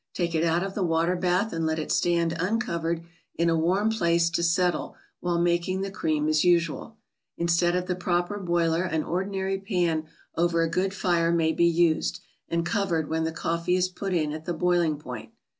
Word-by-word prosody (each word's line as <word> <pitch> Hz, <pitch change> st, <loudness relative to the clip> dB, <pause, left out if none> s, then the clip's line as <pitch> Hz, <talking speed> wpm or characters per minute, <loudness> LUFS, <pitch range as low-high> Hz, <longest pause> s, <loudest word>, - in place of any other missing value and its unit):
Take 175 Hz, -2 st, -1 dB
it 160 Hz, 0 st, +1 dB
out 170 Hz, +1 st, +2 dB
of 195 Hz, 0 st, -4 dB
the 205 Hz, -, -3 dB
water 165 Hz, +1 st, +1 dB
bath 180 Hz, +4 st, 0 dB
and 165 Hz, 0 st, -2 dB
let 160 Hz, 0 st, 0 dB
it 155 Hz, -, -3 dB
stand 170 Hz, -1 st, +2 dB
uncovered 170 Hz, -5 st, -1 dB, 0.3 s
in 170 Hz, 0 st, +2 dB
a -, -, +2 dB
warm 185 Hz, +7 st, +2 dB
place 170 Hz, -5 st, +2 dB
to 165 Hz, -, 0 dB
settle 175 Hz, +1 st, +1 dB, 0.2 s
while 175 Hz, -1 st, -1 dB
making 175 Hz, +2 st, +1 dB
the 195 Hz, 0 st, -3 dB
cream 155 Hz, -6 st, -1 dB
as 155 Hz, -1 st, +2 dB
usual. 175 Hz, +5 st, +1 dB, 0.4 s
Instead 170 Hz, +1 st, +2 dB
of 180 Hz, 0 st, -1 dB
the 180 Hz, -, -1 dB
proper 175 Hz, +2 st, -1 dB
boiler 170 Hz, -2 st, +1 dB
an 160 Hz, -4 st, -1 dB
ordinary 190 Hz, +1 st, -2 dB
pan 175 Hz, -6 st, -1 dB, 0.3 s
over 170 Hz, 0 st, +2 dB
a 165 Hz, -, -1 dB
good 190 Hz, +3 st, 0 dB
fire 170 Hz, -3 st, +1 dB
may 165 Hz, -1 st, +2 dB
be 170 Hz, +1 st, +3 dB
used, 170 Hz, -1 st, +2 dB, 0.3 s
and 170 Hz, 0 st, 0 dB
covered 170 Hz, -5 st, 0 dB
when 160 Hz, 0 st, 0 dB
the 160 Hz, -, -1 dB
coffee 170 Hz, +2 st, -1 dB
is 185 Hz, 0 st, +1 dB
put 195 Hz, +1 st, -5 dB
in 155 Hz, -4 st, 0 dB
at 155 Hz, +1 st, -7 dB
the 175 Hz, -, -2 dB
boiling 175 Hz, -2 st, +1 dB
point. 125 Hz, -6 st, -9 dB
170 Hz, 195 wpm, -26 LUFS, 165-180 Hz, 0.4 s, be